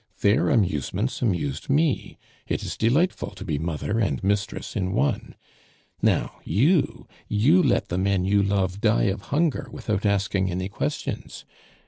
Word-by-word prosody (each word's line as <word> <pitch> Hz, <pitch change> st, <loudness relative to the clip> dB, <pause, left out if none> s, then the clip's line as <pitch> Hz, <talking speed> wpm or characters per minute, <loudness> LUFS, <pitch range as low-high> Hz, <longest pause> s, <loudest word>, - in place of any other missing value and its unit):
Their 110 Hz, +10 st, +3 dB
amusements 100 Hz, -, 0 dB
amused 85 Hz, -, -1 dB
me. 145 Hz, 0 st, +1 dB, 0.3 s
It -, -, -2 dB
is -, -, -4 dB
delightful 145 Hz, +11 st, +1 dB
to 95 Hz, -, -8 dB
be 75 Hz, -6 st, -1 dB
mother 85 Hz, +7 st, -2 dB
and 100 Hz, -3 st, 0 dB
mistress 100 Hz, +2 st, -1 dB
in 95 Hz, -3 st, -1 dB
one. 70 Hz, -, -1 dB, 0.7 s
Now, -, -, +1 dB
you 140 Hz, -, +1 dB, 0.2 s
you 135 Hz, -, +4 dB
let 135 Hz, -8 st, +1 dB
the 90 Hz, -, -1 dB
men 95 Hz, -1 st, +1 dB
you 100 Hz, +1 st, +3 dB
love 100 Hz, -1 st, 0 dB
die 110 Hz, 0 st, +3 dB
of 100 Hz, -, -8 dB
hunger 160 Hz, 0 st, +1 dB
without 105 Hz, -2 st, -2 dB
asking 100 Hz, -2 st, +1 dB
any 90 Hz, +2 st, -3 dB
questions. 100 Hz, -, -4 dB
100 Hz, 145 wpm, -25 LUFS, 95-120 Hz, 0.7 s, you